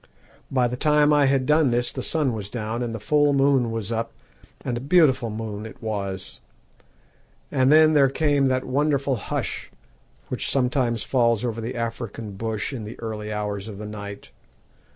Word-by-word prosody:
By 125 -2 +2
the 125 - -3
time 150 +1 +4
I 145 -2 +4
had 135 -1 +2
done 150 0 +4
this 120 0 0
the - - -5
sun 150 -6 0
was 105 -3 -5
down, 115 +1 -3
and 120 -1 -2
the 115 - -5
full 145 +6 +3
moon 135 -3 +3
was 115 -1 -4
up, 115 0 -2 0.5
and 120 - -1
a - - -2
beautiful 135 -5 +3
moon 105 -1 -5
it - - -13
was. 100 -4 -4 1.1
And 130 +1 +3
then 155 0 +6
there 140 -3 +5
came 145 -1 +2
that 130 0 0
wonderful 140 0 +1
hush 100 - -4 0.6
which - - -2
sometimes 125 -3 +1
falls 115 -3 +2
over 115 -1 -3
the 120 +3 -4
African 115 -2 -4
bush 110 +5 -3
in 120 -4 -5
the 105 +2 -9
early 110 -2 -5
hours 105 -1 -3
of 105 -3 -8
the 105 - -7
night. 100 -1 -8
120 Hz, 175 wpm, -24 LUFS, 110-140 Hz, 1.1 s, then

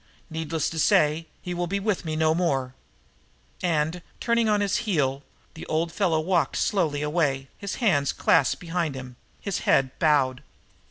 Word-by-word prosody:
Needless 160 0 -2
to 165 - -4
say, 155 +2 +3 0.2
he 180 - -4
will 175 0 -2
be 200 +3 -1
with 200 -3 -1
me 155 -1 -2
no 160 0 +3
more." 135 -7 0 0.9
And, 165 0 0 0.2
turning 235 -1 +2
on 210 -1 +3
his 205 0 +1
heel, 150 - 0 0.3
the 160 - -9
old 165 +2 0
fellow 170 -4 +1
walked 175 +1 +1
slowly 155 -8 0
away, 145 -4 0
his 200 -1 -4
hands 160 - +2
clasped 135 - +2
behind 170 -4 -2
him, 125 -1 -8 0.3
his 200 -3 -2
head 130 -1 +2
bowed. 140 -4 +2
160 Hz, 160 wpm, -25 LUFS, 145-180 Hz, 0.9 s, say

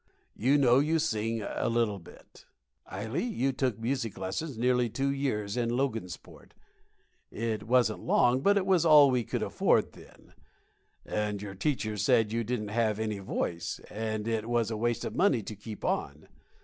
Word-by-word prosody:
You 135 +6 +3
know 130 -2 +5
you 155 +3 +2
sing 115 -7 -1
a - - -2
little 115 -4 0
bit, 85 - -17 0.4
Ily; 110 +7 -3
you 200 - 0
took 130 -4 -1
music 115 -1 -3
lessons 110 - -4
nearly 125 0 +2
two 135 +5 -1
years 110 -8 -2
in 120 -1 0
Logansport. 115 -8 -4 0.8
It 110 -1 -3
wasn't 120 -3 +2
long, 125 +1 +3
but 200 +6 +4
it 190 - +1
was 185 -4 +3
all 150 -4 +7
we 125 -2 +1
could - - -3
afford - - +1
then. - - -17 0.7
And 105 -1 -2
your 100 -1 -7
teacher 110 -1 -2
said 105 +2 +2
you 115 +1 -1
didn't 110 -2 -3
have 110 -1 0
any 110 -2 -3
voice, 85 -3 -3
and 110 0 -3
it 115 0 -2
was 115 -2 +1
a - - -2
waste 120 +2 -1
of - - -5
money 140 - +2
to 110 - -7
keep 105 +1 -8
on. - - -2
115 Hz, 170 wpm, -29 LUFS, 105-130 Hz, 0.8 s, all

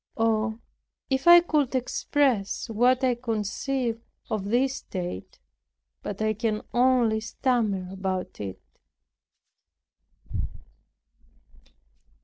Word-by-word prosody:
Oh, 220 0 +1 0.5
if 265 +4 0
I 345 0 +10
could 305 -5 +1
but - - -6
express 255 -4 0
what 250 +4 +3
I 255 -1 +4
conceive 235 +1 -2 0.3
of 215 -3 -1
this 255 +5 +1
state! 175 - -6 0.6
But 205 +1 -4
I 215 0 +2
can 215 0 -2
only 245 -3 +3
stammer 215 -4 0
about 190 -1 -3
it. 95 -2 -5
230 Hz, 95 wpm, -26 LUFS, 210-255 Hz, 0.6 s, I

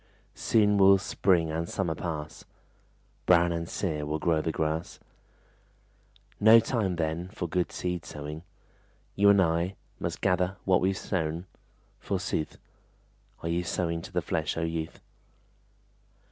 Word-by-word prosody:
Soon 105 -2 +2
will 95 0 +7
spring 90 -4 +1
and 85 +2 -3
summer 90 -4 -1
pass, 75 -2 -5 0.8
Brown 85 -1 +5
and 85 0 -3
sere 80 -6 -2
will 75 +1 -2
grow 80 0 +1
the 80 - -1
grass; 80 +2 -2 1.4
No 110 +2 +8
time 110 -5 -1
then 85 +1 -2
for 90 - -4
good 90 +1 -1
seed 90 -2 -3
sowing: 75 +1 -7 0.7
You 100 +1 +5
and 100 -1 +6
I 85 +1 +1 0.2
Must - - -3
gather 90 +1 +1
what 95 -2 +4
we've 95 0 +1
sown, 85 -2 -2 0.5
forsooth. 75 - -2 0.9
Are 85 - -2
you 85 +1 0
sowing 85 -2 -2
to - - -10
the - - -1
flesh, - - -2
O - - -1
youth? 80 -1 -3
85 Hz, 135 wpm, -28 LUFS, 80-95 Hz, 1.4 s, No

